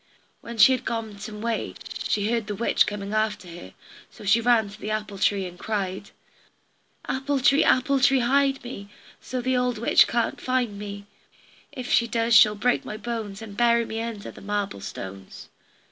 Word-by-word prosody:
When 235 Hz, 0 st, -8 dB
she 265 Hz, -, +8 dB
had 255 Hz, -, 0 dB
gone 220 Hz, -3 st, -4 dB
some 210 Hz, 0 st, -7 dB
way 230 Hz, -1 st, -2 dB, 0.3 s
she 210 Hz, +1 st, 0 dB
heard 230 Hz, -3 st, -1 dB
the 210 Hz, -, -3 dB
witch 235 Hz, -, +2 dB
coming 205 Hz, 0 st, -4 dB
after 215 Hz, -3 st, -1 dB
her. 170 Hz, -, -11 dB, 0.3 s
So -, -, -13 dB
she 215 Hz, +4 st, +4 dB
ran 230 Hz, -2 st, +3 dB
to 210 Hz, -, -14 dB
the 210 Hz, -, -4 dB
apple 215 Hz, -2 st, -4 dB
tree 195 Hz, -1 st, +1 dB
and 180 Hz, 0 st, -9 dB
cried: 195 Hz, -2 st, -3 dB, 1.0 s
"Apple 270 Hz, +1 st, -1 dB
tree, 275 Hz, +3 st, +4 dB
apple 270 Hz, +2 st, +3 dB
tree 265 Hz, 0 st, +4 dB
hide 270 Hz, +2 st, +2 dB
me, 200 Hz, -5 st, -8 dB, 0.3 s
So 255 Hz, 0 st, -4 dB
the 255 Hz, +1 st, 0 dB
old 250 Hz, -1 st, 0 dB
witch 230 Hz, -, +5 dB
can't 235 Hz, 0 st, -1 dB
find 245 Hz, -5 st, -1 dB
me; 205 Hz, -1 st, -7 dB, 0.7 s
If 255 Hz, -1 st, -7 dB
she 235 Hz, -, +4 dB
does 230 Hz, 0 st, +1 dB
she'll 210 Hz, -1 st, +7 dB
pick 245 Hz, +4 st, +1 dB
my 215 Hz, -, -6 dB
bones, 220 Hz, -2 st, -5 dB
And 205 Hz, -2 st, -9 dB
bury 235 Hz, 0 st, +3 dB
me 225 Hz, 0 st, -4 dB
under 230 Hz, -3 st, -6 dB
the -, -, -14 dB
marble 205 Hz, -, -3 dB
stones." 95 Hz, 0 st, -9 dB
220 Hz, 185 wpm, -25 LUFS, 205-240 Hz, 1.0 s, she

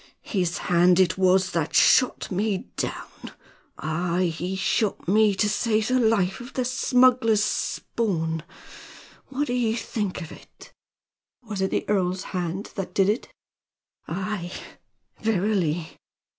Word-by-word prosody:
His 180 Hz, -3 st, -1 dB
hand 180 Hz, 0 st, +3 dB
it 180 Hz, -3 st, +3 dB
was 185 Hz, 0 st, +3 dB
that 165 Hz, -3 st, -2 dB
shot 255 Hz, -, +4 dB
me 195 Hz, 0 st, -1 dB
down! -, -, -6 dB, 0.4 s
aye! 170 Hz, +2 st, -1 dB
he 180 Hz, +4 st, -3 dB
shot 190 Hz, +2 st, 0 dB
me 210 Hz, +1 st, +4 dB
to 210 Hz, -, +2 dB
save 215 Hz, +1 st, +1 dB
the 255 Hz, 0 st, +3 dB
life 205 Hz, -5 st, +2 dB
of 245 Hz, +3 st, -10 dB
the 255 Hz, -, -1 dB
smuggler's 250 Hz, -4 st, +3 dB
spawn! 165 Hz, -12 st, -1 dB, 0.9 s
What 275 Hz, +2 st, -2 dB
d'ye 245 Hz, -4 st, 0 dB
think 210 Hz, -5 st, -3 dB
of 160 Hz, -, -10 dB
it?" -, -, -15 dB, 0.7 s
"Was 210 Hz, -4 st, -5 dB
it 190 Hz, -, +1 dB
the -, -, -2 dB
earl's 185 Hz, -2 st, 0 dB
hand 180 Hz, +2 st, -3 dB
that 190 Hz, -2 st, -5 dB
did 195 Hz, 0 st, +3 dB
it?" 225 Hz, -, -2 dB, 0.8 s
"Aye, 190 Hz, -1 st, -4 dB, 0.7 s
verily." 185 Hz, -6 st, 0 dB
195 Hz, 130 wpm, -25 LUFS, 180-220 Hz, 0.9 s, shot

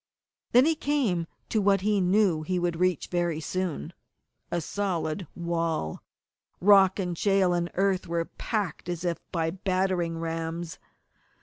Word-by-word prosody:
_ -, -, -59 dB
Then 250 Hz, +3 st, +6 dB
he 325 Hz, -, +4 dB
came 270 Hz, -, 0 dB, 0.2 s
to 215 Hz, -, +1 dB
what 195 Hz, -1 st, +3 dB
he 205 Hz, 0 st, +2 dB
knew 185 Hz, -3 st, +3 dB
he 180 Hz, +4 st, -1 dB
would 175 Hz, -1 st, -1 dB
reach 180 Hz, -3 st, +1 dB
very 175 Hz, -3 st, 0 dB
soon, 175 Hz, -, -3 dB, 0.6 s
a 175 Hz, -, 0 dB
solid 175 Hz, -1 st, -2 dB
wall! 165 Hz, -, -2 dB, 0.6 s
Rock 195 Hz, -1 st, +6 dB
and 180 Hz, -3 st, -2 dB
shale 195 Hz, 0 st, +3 dB
and 175 Hz, 0 st, 0 dB
earth 195 Hz, -1 st, +1 dB
were 170 Hz, 0 st, -1 dB
packed 200 Hz, -5 st, -3 dB
as 175 Hz, 0 st, -3 dB
if 170 Hz, -2 st, -1 dB
by 165 Hz, -2 st, 0 dB
battering 185 Hz, -2 st, 0 dB
rams. 165 Hz, 0 st, -4 dB
180 Hz, 145 wpm, -27 LUFS, 165-195 Hz, 0.6 s, Then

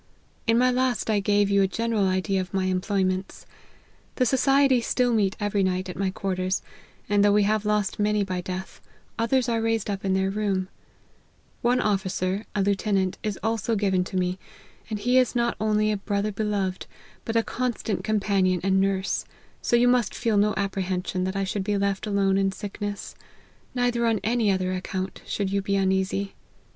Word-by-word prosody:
In 230 Hz, 0 st, +4 dB
my 250 Hz, +1 st, +4 dB
last 250 Hz, -3 st, 0 dB
I 210 Hz, -, +2 dB
gave 205 Hz, 0 st, +2 dB
you 200 Hz, 0 st, +4 dB
a 195 Hz, -, +4 dB
general 225 Hz, -1 st, 0 dB
idea 190 Hz, +1 st, 0 dB
of 185 Hz, +1 st, -6 dB
my 190 Hz, -1 st, +1 dB
employments. 185 Hz, 0 st, -1 dB, 0.7 s
The 255 Hz, -, +2 dB
society 270 Hz, 0 st, +4 dB
still 245 Hz, +1 st, +1 dB
meet 200 Hz, -3 st, +2 dB
every 205 Hz, -1 st, 0 dB
night 185 Hz, 0 st, 0 dB
at 180 Hz, -, -6 dB
my 195 Hz, -1 st, 0 dB
quarters, 185 Hz, 0 st, -2 dB, 0.4 s
and 205 Hz, 0 st, +3 dB
though 205 Hz, -, +5 dB
we 205 Hz, 0 st, +4 dB
have 215 Hz, +1 st, +1 dB
lost 210 Hz, -2 st, 0 dB
many 210 Hz, 0 st, +2 dB
by 185 Hz, -2 st, -3 dB
death, 185 Hz, +1 st, -6 dB, 0.4 s
others 250 Hz, +2 st, +2 dB
are 230 Hz, -1 st, 0 dB
raised 225 Hz, -2 st, 0 dB
up 195 Hz, -1 st, -4 dB
in 190 Hz, -1 st, +1 dB
their 190 Hz, 0 st, +1 dB
room; 195 Hz, -2 st, -1 dB, 0.9 s
one 245 Hz, +1 st, +2 dB
officer, 195 Hz, 0 st, -1 dB
a 200 Hz, -, +2 dB
lieutenant, 195 Hz, -1 st, 0 dB
is 210 Hz, -2 st, -3 dB
also 225 Hz, 0 st, 0 dB
given 195 Hz, -3 st, +1 dB
to 190 Hz, -, -4 dB
me; 180 Hz, +1 st, -1 dB, 0.5 s
and 215 Hz, -, -2 dB
he 250 Hz, +3 st, +4 dB
is 250 Hz, -1 st, +1 dB
not 235 Hz, 0 st, +1 dB
only 215 Hz, 0 st, +2 dB
a 210 Hz, -, 0 dB
brother 200 Hz, +1 st, -1 dB
beloved, 200 Hz, -3 st, -2 dB, 0.4 s
but 225 Hz, -, -4 dB
a 230 Hz, -, +4 dB
constant 240 Hz, -3 st, -2 dB
companion 195 Hz, -4 st, +1 dB
and 190 Hz, 0 st, +3 dB
nurse; 195 Hz, -1 st, 0 dB, 0.4 s
so -, -, +2 dB
you 240 Hz, +1 st, +4 dB
must 245 Hz, -4 st, +2 dB
feel 230 Hz, -3 st, 0 dB
no 210 Hz, +1 st, +3 dB
apprehension 185 Hz, -2 st, -2 dB
that 190 Hz, +1 st, -3 dB
I 195 Hz, -, 0 dB
should 195 Hz, +1 st, -2 dB
be 205 Hz, +1 st, 0 dB
left 200 Hz, +1 st, -1 dB
alone 195 Hz, -1 st, +2 dB
in 195 Hz, 0 st, +2 dB
sick 200 Hz, +2 st, -8 dB
ness; 205 Hz, -1 st, -4 dB, 0.6 s
neither 245 Hz, -1 st, +1 dB
on 225 Hz, -2 st, +2 dB
any 225 Hz, -1 st, +2 dB
other 185 Hz, -1 st, 0 dB
account 185 Hz, +1 st, -4 dB
should 195 Hz, -2 st, -2 dB
you 200 Hz, 0 st, +1 dB
be 200 Hz, 0 st, -1 dB
uneasy. 190 Hz, +1 st, 0 dB
200 Hz, 185 wpm, -25 LUFS, 190-220 Hz, 0.9 s, though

